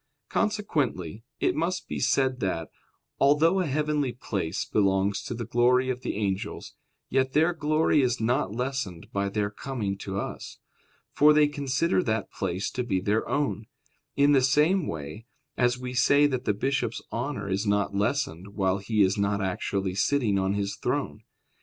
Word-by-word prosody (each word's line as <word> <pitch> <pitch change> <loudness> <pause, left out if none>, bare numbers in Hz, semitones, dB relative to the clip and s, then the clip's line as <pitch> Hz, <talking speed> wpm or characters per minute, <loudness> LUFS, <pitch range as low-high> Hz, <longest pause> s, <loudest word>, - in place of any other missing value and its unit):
Consequently, 135 - -1 0.2
it - - +2
must 170 +4 -2
be - - -4
said 130 -1 +1
that, 90 -6 -2 0.5
although 155 +7 +4
a 180 - 0
heavenly 150 -2 0
place 95 -8 -3
belongs 100 -1 +1
to - - -5
the 115 0 -4
glory 125 +3 +3
of 125 0 -5
the - - -3
angels, 100 -2 -3 0.3
yet 130 0 0
their 160 +4 +3
glory 155 -1 +2
is 125 -2 +1
not 120 -1 0
lessened 125 -7 -4
by 100 0 0
their 100 0 -1
coming 110 -4 -3
to 100 0 -4
us, - - -6 0.6
for 150 +1 +6
they 150 0 +5
consider 145 +5 0
that 110 -7 -2
place 95 +1 -3
to 125 - -2
be 95 -6 0
their 105 +4 0
own; 140 -6 -1 0.5
in 140 +1 +4
the 135 -2 +5
same 150 +7 +3
way 80 +9 -6 0.3
as 120 0 +2
we 125 0 -6
say 140 +3 +4
that 130 -3 -1
the 105 - +2
bishop's 135 +6 -1
honor - - -3
is 100 +2 -1
not 100 -1 +1
lessened 100 - -2
while 95 -1 +1
he 105 +1 +2
is 95 +2 +1
not 100 0 +1
actually 95 0 -2
sitting 105 0 +1
on 95 +1 0
his 100 -1 -2
throne. - - -2
120 Hz, 165 wpm, -27 LUFS, 100-140 Hz, 0.6 s, for